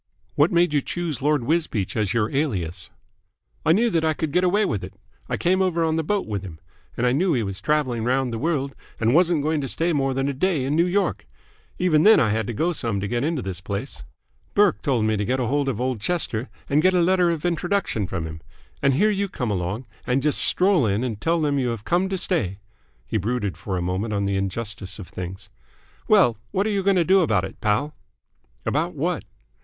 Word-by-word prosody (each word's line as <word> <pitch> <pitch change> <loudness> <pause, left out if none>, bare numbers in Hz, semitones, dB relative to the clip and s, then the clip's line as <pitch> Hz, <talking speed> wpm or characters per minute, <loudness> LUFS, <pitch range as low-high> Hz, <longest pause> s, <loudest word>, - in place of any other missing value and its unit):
"What 145 +4 +3
made 170 -2 +3
you 145 - +3
choose 165 -4 -4
Lord 145 -2 +2
Wisbeach 150 - -1
as 105 -4 0
your 115 +2 0
alias?" 95 - -2 0.7
"I 160 - +3
knew 225 +7 +3
that 165 -3 +1
I 160 -1 +1
could 155 -1 -2
get 180 +4 +2
away 200 +4 +3
with 105 - -2
it. 95 +1 -8 0.3
I - - -1
came 185 +2 +2
over 175 -3 +1
on 160 -1 +1
the 160 - 0
boat 205 +5 0
with 105 -3 -3
him, 85 -5 -9 0.4
and 120 - +1
I 125 - +3
knew 170 +6 +2
he 120 -5 +1
was 100 -2 -5
travelling 130 -4 0
round 125 0 0
the 115 - -3
world 140 -3 -1 0.3
and 115 +1 +2
wasn't 170 -2 +3
going 155 0 0
to 135 - -3
stay 165 +6 0
more 135 -2 0
than 135 +1 0
a 140 - -1
day 150 -1 0
in 140 +3 0
New 170 +2 +3
York. 190 - -1 0.5
Even 170 -4 +3
then 220 +6 +7
I 110 -4 +2
had 110 +1 -1
to - - -2
go 165 +10 0
some 115 -9 -2
to 100 - -3
get 120 +3 -1
into 155 -4 -1
this 95 -2 -5
place. 100 +1 -5 0.5
Burke 205 -2 +4
told 125 -7 +1
me 110 0 +1
to 105 - -1
get 130 +5 0
hold 135 +3 0
of 120 -4 -3
old 125 -3 -1
Chester 130 -7 -1 0.2
and 145 +2 +3
get 185 +2 +3
a - - +4
letter 180 0 +3
of 165 -1 -2
introduction 175 - 0
from 85 -4 -3
him. 80 0 -8 0.4
And 135 -1 +3
here 210 +8 +3
you 200 -1 -1
come 125 - -3
along 100 +6 -2 0.2
and 130 +2 +1
just 150 -1 +2
stroll 180 - +3
in 105 +4 0
and 115 -5 -4
tell 165 +1 +1
them 145 -2 +1
you 130 - 0
have 115 -3 -4
come 180 +2 +1
to 190 - -1
stay!" 115 - 0 0.5
He - - -1
brooded 105 -2 -2
for 95 -3 -4
a 90 - -2
moment 95 +5 -2
on 100 - 0
the 100 0 0
injustice 95 0 -4
of 100 -5 -9
things. 95 +2 -7 0.6
"Well, 180 - +5
what 195 +2 0
are 215 - 0
you 200 -1 0
going 195 0 +3
to 175 - +4
do 190 +3 +5
about 110 - +2
it, 95 - -11
Pal?" 110 +9 0 0.7
"About 165 +4 -1
what?" 165 +4 -2
135 Hz, 235 wpm, -23 LUFS, 110-170 Hz, 0.7 s, then